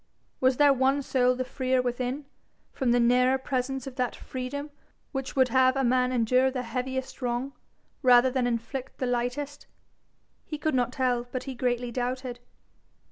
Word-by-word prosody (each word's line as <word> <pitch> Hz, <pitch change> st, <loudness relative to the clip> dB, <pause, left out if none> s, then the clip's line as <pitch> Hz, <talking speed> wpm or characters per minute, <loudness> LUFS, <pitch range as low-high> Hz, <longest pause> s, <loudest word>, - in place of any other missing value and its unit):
Was 260 Hz, -1 st, +3 dB
there 290 Hz, -1 st, +6 dB
one 270 Hz, +2 st, +2 dB
soul 250 Hz, -1 st, +2 dB
the 255 Hz, -, -2 dB
freer 260 Hz, 0 st, 0 dB
within, 250 Hz, +3 st, -2 dB, 0.5 s
from 260 Hz, -, -1 dB
the 245 Hz, -, +4 dB
nearer 250 Hz, +2 st, +4 dB
presence 265 Hz, 0 st, -2 dB
of 265 Hz, -2 st, -8 dB
that 250 Hz, -1 st, -1 dB
freedom 285 Hz, +3 st, -6 dB, 0.4 s
which 270 Hz, -2 st, -4 dB
would 260 Hz, -2 st, +4 dB
have 260 Hz, +1 st, +4 dB
a 270 Hz, -, +1 dB
man 250 Hz, 0 st, +2 dB
endure 255 Hz, +2 st, +3 dB
the 255 Hz, -1 st, -3 dB
heaviest 260 Hz, +3 st, -4 dB
wrong, 250 Hz, +2 st, -2 dB, 0.5 s
rather 250 Hz, 0 st, +6 dB
than 250 Hz, -1 st, +1 dB
inflict 245 Hz, +3 st, -4 dB
the 255 Hz, -, -2 dB
lightest? 250 Hz, +4 st, -2 dB, 0.8 s
He 305 Hz, -, -6 dB
could 310 Hz, +1 st, -1 dB
not 245 Hz, -2 st, +1 dB
tell, 250 Hz, -2 st, 0 dB
but 255 Hz, -1 st, -3 dB
he 270 Hz, -, -5 dB
greatly 245 Hz, -1 st, -1 dB
doubted. 250 Hz, 0 st, -3 dB
255 Hz, 165 wpm, -27 LUFS, 245-265 Hz, 0.8 s, there